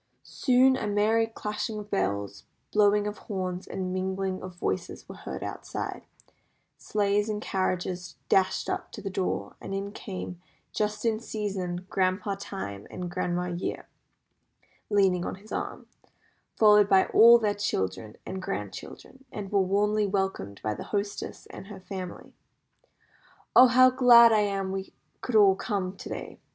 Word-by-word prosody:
Soon 260 0 +3
a 215 - -3
merry 215 +2 +2
clashing 215 0 -4
of 210 0 -8
bells, 100 +1 -2 0.3
blowing 210 0 +4
of 210 0 -4
horns, 185 -3 -4
and 185 -1 -4
mingling 190 0 -2
of 185 -1 -8
voices 175 - -3
were - - -8
heard - - -7
outside, - - -6 0.7
sleighs 205 0 0
and 210 -1 -2
carriages 185 -2 -2
dashed 190 -1 +2
up - - -3
to - - -7
the 195 -1 -5
door, 185 0 -2
and 195 - -5
in 200 +1 -4
came, 185 -4 -7 0.3
"just 210 +1 -2
in 220 -1 +1
season," 190 -5 -4
Grandpa 190 +1 0
Time, 100 - -6
with 180 -1 -5
Grandma 180 -1 -1
Year 175 +1 -4 1.0
leaning 190 -4 +3
on - - -4
his 205 +3 -17
arm, - - -4 0.7
followed 210 -2 +6
by 190 -1 +5
all 235 +2 +8
their 215 -3 0
children 110 - -3
and 190 0 -5
grandchildren, 185 - -7
and 200 -2 -6
were 200 -1 +3
warmly 205 +2 +1
welcomed 190 - -2
by 110 - 0
the - - -7
hostess 205 0 -4
and - - -10
her 205 -2 -9
family. 185 -1 -8 1.2
"Oh, 255 - +10
how 255 +1 +6
glad 240 -2 +8
I 215 - +4
am 195 -2 -1
we 190 0 -5 0.3
could 250 - -3
all 200 -3 +7
come 195 -3 -3
to - - -9
day!" - - -7
195 Hz, 150 wpm, -27 LUFS, 185-210 Hz, 1.2 s, Oh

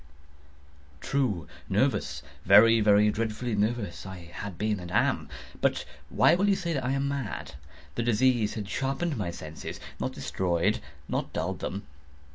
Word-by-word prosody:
True!—nervous—very, 105 - +2
very 105 0 +5
dreadfully 115 +2 -2
nervous 105 -2 -1
I 90 -3 -9
had 100 -4 -6
been 105 -1 0
and 90 -1 -7
am; - - +1 0.3
but - - +1 0.2
why - - +5
will 195 +4 +3
you 200 - +4
say 170 -3 -2
that 135 -4 -1
I 130 +2 0
am 135 0 0
mad? 105 - -4 0.4
The - - -2
disease 120 -1 +2
had 105 -3 -4
sharpened 140 - -1
my 100 -7 -2
senses—not 80 -4 -6
destroyed—not 85 - -2
dulled 90 +3 -2
them. 100 - -4
105 Hz, 130 wpm, -28 LUFS, 90-125 Hz, 0.4 s, very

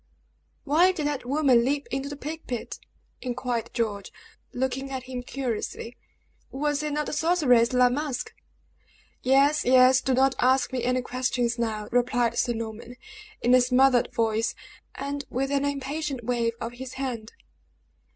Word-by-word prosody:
"Why 330 +5 +4
did 315 -5 -4
that 290 -4 -2
woman 270 -4 +4
leap 280 +3 0
into 270 +1 -2
the 290 - -6
plague 310 +3 -7
pit?" 245 -2 -5 0.4
inquired 245 -2 -3
George, 210 -4 -3 0.4
looking 265 +1 -2
at 260 -2 -4
him 255 -1 -6
curiously. 245 -2 -4 0.5
"Was 290 +1 -1
it 300 -1 -2
not 300 0 -1
the - - -5
sorceress, 295 -7 +3
La 250 0 +5
Masque?" 275 0 -3 0.9
"Yes, 280 +3 +3
yes. 255 +1 +6
Do 265 - +1
not 265 +1 +3
ask 260 +1 +2
me 250 -2 -2
any 250 +1 +1
questions 245 -1 -1
now," 215 -2 -2
replied 245 -1 +1
Sir 240 - +1
Norman, 230 +1 -7 0.5
in 245 - +4
a 255 - +7
smothered 250 0 +3
voice, 225 0 0 0.4
and 280 +1 -4
with 270 +2 -2
an 280 0 +1
impatient 280 -1 -3
wave 235 -1 0
of 230 - -4
his 255 +1 -8
hand. 250 -5 -5
255 Hz, 150 wpm, -26 LUFS, 240-280 Hz, 0.9 s, a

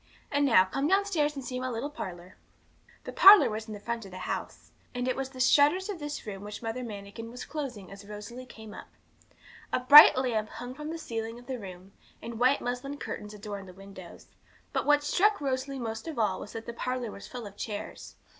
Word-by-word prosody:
And 285 0 +2
now, 190 -7 +6
come 270 +9 -1
downstairs 360 -6 +1
and 270 -2 -6
see 250 +1 -4
my 255 0 -3
little 250 +5 -4
parlour.' 180 - -8 0.7
The - - -6
parlour 395 - +9
was 215 +1 -5
in 215 - -6
the - - -9
front 235 +2 -4
of 195 - -10
the 185 - -9
house, 185 - -5 0.2
and 245 0 -2
it 255 - 0
was 270 0 -3
the 260 -1 -12
shutters 295 +9 +4
of 390 -5 -4
this 295 0 -6
room 200 -2 -7
which 210 +2 -8
Mother 230 +3 -3
Manikin 210 0 -8
was 245 +2 -8
closing 265 - -6
as 200 +1 -11
Rosalie 225 +5 -9
came 220 -3 -11
up. - - -10 0.8
A - - +1
bright 285 +3 +10
lamp 225 -5 0
hung 245 +1 -8
from 300 +3 -7
the 330 - -4
ceiling 225 -6 -5
of 245 - -14
the 260 -1 -5
room, 185 -1 -10 0.3
and 230 -1 -7
white 255 +3 +3
muslin 250 +4 -4
curtains 210 -6 -7
adorned 200 -2 -7
the 185 - -11
window; 195 -2 -11 0.6
but - - -1
what 295 0 +4
struck 405 +8 +2
Rosalie 270 -1 -2
most 225 +1 -5
of 315 -5 -6
all 205 -5 +1
was - - -9
that 225 0 -7
the 235 - -6
parlour 250 -1 -3
was 200 - -10
full 245 -3 -7
of 200 -1 -10
chairs. 205 -1 -7
240 Hz, 220 wpm, -29 LUFS, 210-280 Hz, 0.8 s, bright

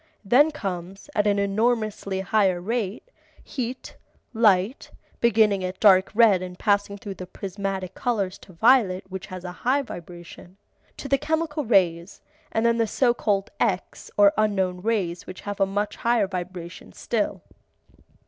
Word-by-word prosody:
Then 265 +9 +5
comes, 195 - -6
at 210 -4 +1
an 205 0 +2
enormously 200 -1 0
higher 190 -2 +2
rate, 225 - -3 0.3
heat, 255 -1 -6 0.4
light 215 +1 +2 0.3
(beginning 215 -4 +3
at 185 0 -4
dark 190 -3 +6
red 215 -5 +5
and 180 -1 -7
passing 205 -1 +1
through 200 0 -7
the 185 -1 -9
prismatic 195 0 -5
colors 205 -7 -2
to - - -15
violet 210 -1 +3
which 190 0 -7
has 185 -2 -8
a 180 - -5
high 275 +3 +2
vibration), 175 -2 -11 0.4
to - - -6
the 275 0 +2
chemical 315 -1 -1
rays, 180 -5 +1 0.3
and 225 +1 0
then 235 0 +3
the 225 - +2
so 240 +3 +2
called 205 -4 -1
X 195 -5 -2
or 205 -1 +6
unknown 190 -4 0
rays 190 -5 -1
which 185 - -9
have 205 0 -6
a 195 - +3
much 205 +2 -2
higher 235 -3 +2
vibration 180 -2 -7
still. - - -2
200 Hz, 150 wpm, -24 LUFS, 185-230 Hz, 0.4 s, dark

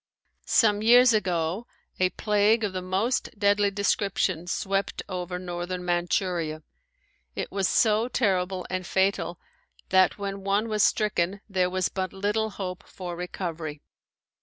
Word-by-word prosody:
Some 210 -2 +4
years 245 +2 +7
ago 185 0 -1 0.3
a 185 0 +3
plague 210 +3 +2
of 200 -3 -1
the 185 - -3
most 195 +7 0
deadly 205 0 +3
description 195 -3 0
swept 195 +2 -1
over 180 -1 -4
northern 180 0 -5
Manchuria. 175 -2 -1 0.7
It - - -4
was 195 -1 +1
so 220 +3 +3
terrible 190 -6 0
and 185 0 -3
fatal 190 -3 0 0.5
that 185 0 +4
when 200 -1 -5
one 200 +3 +1
was 215 -1 +1
stricken 200 -2 +1
there 185 -3 +1
was 185 0 0
but 185 -1 -3
little 210 +3 0
hope 185 -3 -5
for 180 -2 -7
recovery. 170 -4 -5
190 Hz, 135 wpm, -26 LUFS, 180-205 Hz, 0.7 s, years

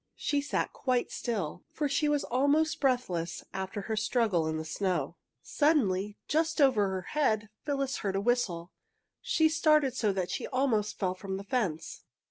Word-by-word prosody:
She 290 -2 0
sat 280 - -2
quite 255 -2 0
still, 195 -8 -3
for 300 - -1
she 295 +2 +1
was 295 -1 +1
almost 285 +5 +2
breathless 240 - 0
after 190 +2 -4
her 220 +3 -3
struggle 215 -6 +1
in 160 0 -1
the 160 - -4
snow. 180 +3 -1 0.3
Suddenly, 210 - +1
just 320 +2 +1
over 240 -9 +4
her 190 -1 -2
head, 220 -8 +1
Phyllis 275 -3 -1
heard 195 -2 -2
a - - +2
whistle. 200 -7 0 0.5
She 485 -10 +3
started 305 -4 +3
so 215 -3 +1
that 185 -2 -2
she - - -3
almost 240 -6 0
fell 185 -2 0
from 190 +1 -5
the 195 - -6
fence. 200 -8 -2
230 Hz, 165 wpm, -30 LUFS, 190-285 Hz, 0.5 s, over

